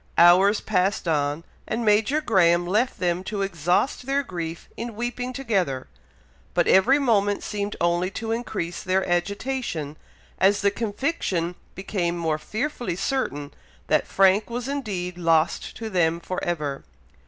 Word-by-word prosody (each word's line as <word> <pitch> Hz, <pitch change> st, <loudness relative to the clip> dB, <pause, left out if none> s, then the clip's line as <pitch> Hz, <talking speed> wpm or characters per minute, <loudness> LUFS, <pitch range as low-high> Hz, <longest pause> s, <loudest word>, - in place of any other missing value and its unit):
Hours 185 Hz, +5 st, +6 dB
passed 190 Hz, -2 st, 0 dB
on, 145 Hz, 0 st, 0 dB, 0.2 s
and 230 Hz, +1 st, -2 dB
Major 220 Hz, +8 st, +3 dB
Graham 175 Hz, -, +3 dB
left 215 Hz, +8 st, +1 dB
them 180 Hz, 0 st, 0 dB
to 200 Hz, -1 st, -2 dB
exhaust 180 Hz, -, 0 dB
their 280 Hz, +1 st, +1 dB
grief 170 Hz, -6 st, -6 dB
in 230 Hz, -1 st, -6 dB
weeping 245 Hz, +2 st, -3 dB
together, 195 Hz, -, -1 dB, 0.7 s
but -, -, +3 dB
every 235 Hz, +9 st, +5 dB
moment 205 Hz, -7 st, +2 dB
seemed 205 Hz, 0 st, -3 dB
only 175 Hz, +1 st, +1 dB
to 225 Hz, +3 st, -4 dB
increase 215 Hz, -7 st, -3 dB
their 190 Hz, -1 st, 0 dB
agitation, 175 Hz, -, -2 dB, 0.4 s
as 200 Hz, +2 st, +4 dB
the 200 Hz, 0 st, +3 dB
conviction 205 Hz, -, -2 dB, 0.2 s
became 175 Hz, -2 st, -2 dB
more 160 Hz, -2 st, -1 dB
fearfully 230 Hz, -, -3 dB
certain 170 Hz, -, -2 dB, 0.4 s
that -, -, +2 dB
Frank 195 Hz, +3 st, +3 dB
was 240 Hz, +1 st, -4 dB
indeed 195 Hz, -11 st, -3 dB
lost 165 Hz, -1 st, +1 dB
to 225 Hz, -, -5 dB
them 170 Hz, -5 st, +1 dB
for 185 Hz, +1 st, -5 dB
ever. 150 Hz, -5 st, -2 dB
190 Hz, 140 wpm, -24 LUFS, 170-225 Hz, 0.7 s, Hours